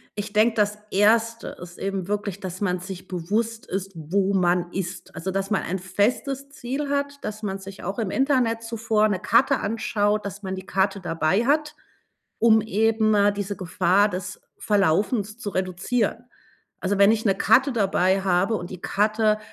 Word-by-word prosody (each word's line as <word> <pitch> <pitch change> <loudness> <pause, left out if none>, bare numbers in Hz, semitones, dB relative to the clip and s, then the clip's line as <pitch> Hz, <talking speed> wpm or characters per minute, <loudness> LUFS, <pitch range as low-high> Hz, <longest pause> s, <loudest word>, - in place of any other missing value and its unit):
Ich 205 0 -5
denke, 220 +2 +3
das 210 0 +1
1. 225 +3 +2
ist 175 0 -10
eben 195 -2 -3
wirklich, 205 -1 -3
dass 185 -2 -6
man 180 -3 0
sich 185 0 -8
bewusst 215 +6 -2
ist, 195 0 -4
wo 190 +5 0
man 175 -1 +1
ist. 185 -2 -5
Also 165 +4 -4
dass 195 +2 -2
man - - +2
ein 185 +2 -3
festes 250 +9 -1
Ziel 280 +1 -4
hat, 280 0 -2
dass 215 +1 -5
man 195 -1 -3
sich 195 0 -10
auch 195 +5 -4
im 210 -4 -1
Internet 255 -5 +1
zuvor 225 -1 +1
'ne 200 -3 -1
Karte 250 +8 +3
anschaut, 210 -1 0
dass 200 +1 -7
man 190 0 -3
die 190 0 -8
Karte 195 +1 0
dabei 175 +4 0
hat, 300 +2 +1 0.6
um 220 -1 +5
eben, 220 +1 +2
äh, 205 0 +4
diese 200 0 -4
Gefahr 185 +3 +2
des 185 0 -6 0.2
Verlaufens 205 +3 +1
zu 210 -4 -5
reduzieren. 195 +6 -1 0.5
Also, 195 +1 -1
wenn 200 +2 +7
ich 225 -1 0
'ne 195 - +4
Karte 260 +6 +4
dabei 195 -3 +2
habe 195 +3 +2
und 175 -3 -5
die 185 - -8
Karte 215 +1 +1
205 Hz, 175 wpm, -24 LUFS, 190-225 Hz, 0.6 s, wenn